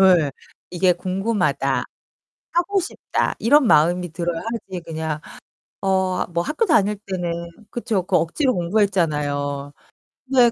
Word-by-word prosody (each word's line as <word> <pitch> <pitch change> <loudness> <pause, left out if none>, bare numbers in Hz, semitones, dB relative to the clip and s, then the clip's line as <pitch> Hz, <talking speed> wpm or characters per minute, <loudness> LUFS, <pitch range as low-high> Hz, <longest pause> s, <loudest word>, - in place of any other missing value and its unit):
예. 180 -6 +5 0.4
'이게 180 0 +3
궁금하다. 195 +5 0 0.7
하고 350 +4 +2
싶다.' 360 - -2
이런 270 +2 +5
마음이 175 +2 +4
들어야 170 0 -3
하지 205 -6 -5
그냥. 160 -2 -4 0.6
어 190 -1 +1
뭐 170 0 +1
학교 305 - 0
다닐 210 - +3
때는 180 -3 -2 0.4
그렇죠. 230 -5 -1
그 185 +1 +1
억지로 255 - +1
공부했잖아요. 150 -7 0 0.6
근데 245 -3 +5
185 Hz, 265 characters per minute, -22 LUFS, 170-220 Hz, 0.7 s, 예